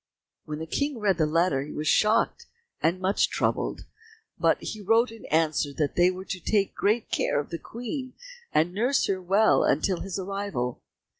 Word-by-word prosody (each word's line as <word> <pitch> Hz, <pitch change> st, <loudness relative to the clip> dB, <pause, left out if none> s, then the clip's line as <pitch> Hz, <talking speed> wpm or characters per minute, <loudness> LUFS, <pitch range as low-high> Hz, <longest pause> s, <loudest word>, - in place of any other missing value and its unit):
When 150 Hz, -1 st, -5 dB
the 160 Hz, -, -5 dB
King 285 Hz, -, -1 dB
read 200 Hz, -5 st, +1 dB
the 155 Hz, -, +3 dB
letter 160 Hz, -3 st, +2 dB
he 145 Hz, +2 st, -7 dB
was 155 Hz, +1 st, -3 dB
shocked 220 Hz, -, +2 dB, 0.3 s
and 170 Hz, +3 st, +1 dB
much 190 Hz, +2 st, +2 dB
troubled, -, -, -1 dB, 0.5 s
but -, -, +3 dB
he 215 Hz, -, -6 dB
wrote 225 Hz, +4 st, +3 dB
in 225 Hz, -, -12 dB
answer 155 Hz, -2 st, +1 dB
that 145 Hz, 0 st, -1 dB
they 175 Hz, +1 st, +5 dB
were 185 Hz, +1 st, -6 dB
to 185 Hz, -, -4 dB
take 200 Hz, +2 st, +1 dB
great 215 Hz, +3 st, 0 dB
care -, -, +1 dB
of 145 Hz, -, -5 dB
the 170 Hz, -, -4 dB
Queen 250 Hz, +3 st, -6 dB, 0.4 s
and 165 Hz, +3 st, +2 dB
nurse 245 Hz, +7 st, +2 dB
her 190 Hz, -1 st, -1 dB
well 195 Hz, +5 st, +4 dB
until 190 Hz, -3 st, +1 dB
his 195 Hz, -2 st, -4 dB
arrival. 195 Hz, -10 st, -3 dB
190 Hz, 180 wpm, -26 LUFS, 160-215 Hz, 0.5 s, they